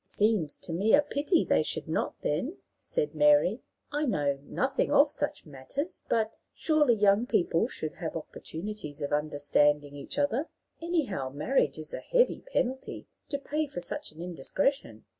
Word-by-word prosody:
"It - - -30
seems 205 -8 +1
to 165 - -6
me 200 +8 +5
a 295 - +4
pity 295 +4 +1
they - - +3
should - - -2
not, - - -2
then," - - -1 0.2
said 150 +1 -2
Mary. 150 - +4 0.3
"I 295 +1 0
know 145 - +1
nothing 265 - -1
of 285 +1 +5
such 295 - -3
matters, 155 - -5
but, 220 -1 +2 0.2
surely, 300 -6 +3
young 205 +2 +4
people 175 +2 +2
should 155 -10 -4
have 160 -2 -4
opportunities 160 -1 -6
of 145 - -2
understanding 145 -1 +2
each 140 - -6
other. 285 +1 +1 0.3
Anyhow, 290 - -1
marriage 145 - +1
is 155 -1 -5
a - - -3
heavy - - +2
penalty 265 - -2 0.2
to 280 - -1
pay 300 +2 -2
for 180 - -6
such - - -5
an 160 +2 -9
indiscretion. 180 - -1
200 Hz, 160 wpm, -29 LUFS, -, 0.3 s, me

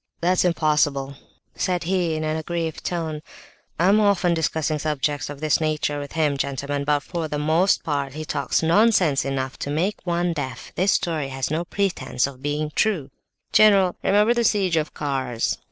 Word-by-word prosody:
"That's 180 +2 +2
impossible!" 150 -5 +1 0.4
said 180 -2 -1
he 175 -2 0
in 155 - -3
an 155 0 -1
aggrieved 165 0 -3
tone. 160 -3 -3 0.6
"I 175 - +3
am 205 +2 +5
often 200 -4 +3
discussing 160 -2 -1
subjects 145 -1 -1
of 145 0 -8
this 155 0 +2
nature 155 -1 -1
with 145 -1 -7
him, 150 -3 +1
gentlemen, 140 +1 -2
but 145 0 +2
for 165 +2 -4
the 150 - -3
most 160 +6 +2
part 140 -3 -2
he 155 0 -5
talks 140 +1 -1
nonsense 180 -4 +3
enough 135 -1 -3
to - - -4
make 170 +8 0
one 175 0 0
deaf: 130 -5 -6
this 190 +3 +2
story 160 -5 -1
has 135 0 -3
no 165 +3 -1
pretence 170 -11 -1
of 135 -2 -8
being 150 +1 -2
true." 170 -11 0 0.4
"General, 200 -4 +5
remember 210 +4 +4
the 240 -1 0
siege 195 -6 +2
of 155 -1 -1
Kars! 130 -5 -2
155 Hz, 175 wpm, -23 LUFS, 145-175 Hz, 0.6 s, am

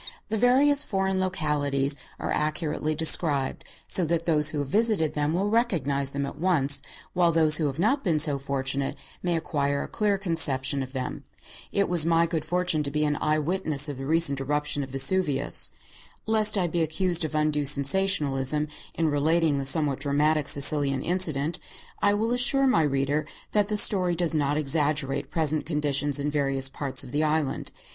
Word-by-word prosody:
The 220 - -1
various 275 +4 +3
foreign 190 -1 -2
localities 145 -6 0 0.2
are - - -4
accurately 155 0 -2
described, 150 -3 +2 0.2
so 185 - +3
that 165 +1 -2
those 150 -3 +4
who 150 - -5
have 145 -1 -3
visited 205 -3 +1
them 150 +2 -1
will 200 +3 -1
recognize 145 - 0
them 140 0 -3
at 140 - -9
once, 145 -6 +2 0.3
while 175 -2 +2
those 155 -2 +4
who 155 - -1
have 135 -1 -5
not 225 - +1
been 170 -5 +1
so 150 -2 +2
fortunate 135 0 -3 0.3
may 175 -1 -1
acquire 140 -3 -2
a - - -7
clear 210 -2 -1
conception 145 -7 +1
of 130 0 -7
them. 130 -1 -5 0.5
It 200 - 0
was 175 -3 +3
my 165 +1 +2
good 165 -2 -3
fortune 175 -1 0
to 145 - -3
be 150 +1 -1
an 150 0 0
eye 155 0 +1
witness 155 -2 0
of 145 -3 -6
the 135 0 -7
recent 160 -3 +3
great 135 - -6
eruption 150 0 -1
of 135 - -6
Vesuvius. 140 +1 0 0.6
Lest 215 -1 +3
I 185 - +1
be 170 0 -2
accused 175 +2 0
of 155 0 -4
undue 150 -1 0
sensationalism 145 -1 +1 0.3
in 165 -1 0
relating 150 0 +1
the 135 - -1
somewhat 145 -2 +1
dramatic 145 +1 0
Sicilian 140 -2 +3
incident, 165 -4 -1 0.4
I 205 0 +3
will 225 +3 -1
assure 265 +2 +3
my 255 -11 +3
reader 140 +1 -1 0.2
that 210 -1 +1
the 210 0 -2
story 185 -4 +3
does 170 -1 0
not 145 -1 0
exaggerate 145 -2 -1
present 155 -2 0
conditions 145 -2 0
in 145 +1 -2
various 135 -2 -1
parts 135 -2 -3
of - - -11
the 150 +3 0
island. 155 -2 -2
155 Hz, 180 wpm, -25 LUFS, 140-175 Hz, 0.6 s, those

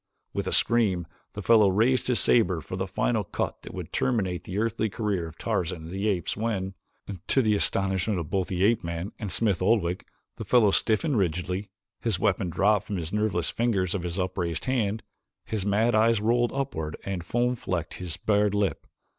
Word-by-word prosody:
With - - -2
a - - -1
scream 100 -7 +3 0.3
the - - -6
fellow 110 -4 +6
raised 115 +7 +2
his 125 -2 +2
saber 95 -8 +3
for 95 - -7
the 95 +1 -2
final 105 +3 0
cut 90 - -4
that - - -10
would - - -7
terminate 95 -9 0
the 95 - -5
earthly 110 0 0
career 100 -5 -2
of 80 0 -12
Tarzan 90 -6 -2
of 80 - -8
the 95 +3 -2
Apes 95 -5 -1
when, 100 -4 -2 0.5
to 135 - +3
the 110 -1 +3
astonishment 95 -1 +1
of 85 0 -6
both 95 -2 0
the 90 0 -1
ape 110 -1 +3
man 85 +3 -4
and 105 -4 -4
Smith 100 -6 +2
Oldwick, 95 -3 +1 0.3
the - - -5
fellow 115 -5 +4
stiffened 115 +6 +2
rigidly, 90 +2 -2 0.3
his 115 -5 0
weapon 95 -1 0
dropped 105 +4 +2
from 100 -3 -3
the 85 +4 -3
nerveless 105 -5 0
fingers 100 -7 0
of 100 - -2
his 90 +1 -4
upraised 90 -3 -2
hand, 110 -5 0 0.4
his 105 -3 -2
mad 110 +4 +2
eyes 110 0 +4
rolled 120 +3 +2
upward 80 - -3
and 95 -3 -3
foam 120 +7 0
flecked 90 -8 -3
his 85 -3 -5
bared 105 +2 +1
lip. 100 -2 -1
100 Hz, 190 wpm, -26 LUFS, 90-110 Hz, 0.5 s, fellow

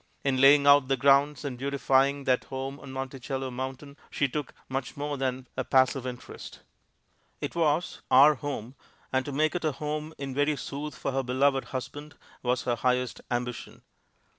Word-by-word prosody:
In 130 -2 +1
laying 140 +1 +7
out 140 -2 +6
the 135 0 +1
grounds 140 +3 +3
and 125 -3 -4
beautifying 140 0 +2
that 130 -1 +1
home 135 +1 -5
on 135 - -10
Monticello 135 0 -4
mountain, 130 +3 -6
she 145 - 0
took 145 +2 -4 0.2
much 130 0 -4
more 145 0 -2
than 130 -1 -3
a 130 - -1
passive 130 0 +2
interest. 125 -1 -9 0.8
It - - -4
was 165 0 0
"Our 140 +4 +8
Home," 130 -4 -5 0.4
and 130 0 +2
to 145 - -4
make 155 +3 +1
it 175 - -3
a 155 -2 +1
home 155 +1 -4
in 135 -1 -5
very 145 +2 +1
sooth 145 +1 -6
for - - -2
her 135 0 0
beloved 135 +2 +1
husband 145 +3 -7 0.3
was 125 0 0
her 120 -1 0
highest 125 +1 0
ambition. 120 0 -4
135 Hz, 170 wpm, -28 LUFS, 130-145 Hz, 0.8 s, Our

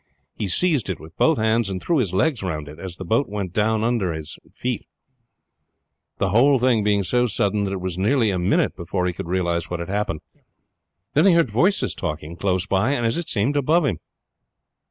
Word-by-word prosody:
He 105 - -3
seized 140 - +1
it 90 - -3
with 80 +1 -13
both 160 -2 +3
hands, 110 -1 +1
and 95 -1 -3
threw 165 - 0
his 105 -9 0
legs 125 +6 +1
round 75 -5 -4
it 75 +2 -11
as 90 -1 -7
the 95 - -7
boat 115 +10 +1
went 100 -4 -4
down 110 +1 +1
from 115 - +2
under 100 -8 0
his 80 -1 -6 0.2
feet, 125 -1 -4 1.3
the 95 - 0
whole 130 +7 +5
thing 120 -3 +2
being 100 -1 +2
so 125 +7 +1
sudden 100 -1 0
that 95 - -3
it 95 - -4
was 90 -1 -3
nearly 110 +1 +2
a 90 - -1
minute 90 +4 +1
before 90 +1 -2
he 90 - -1
could 85 - -6
realize 85 -2 -1
what 90 - -3
had 85 - -5
happened. 100 -6 -2 0.9
Then 155 +6 +4
he 190 - +6
heard 165 -9 +3
voices 175 - +2
talking 75 +2 -5
close 95 0 0
by 100 +7 +1
and, 120 -4 -1
as 115 - +1
it 170 -1 -4
seemed, 120 +7 0
above 150 +4 +3
him. 105 - -1
100 Hz, 215 wpm, -22 LUFS, 90-125 Hz, 1.3 s, he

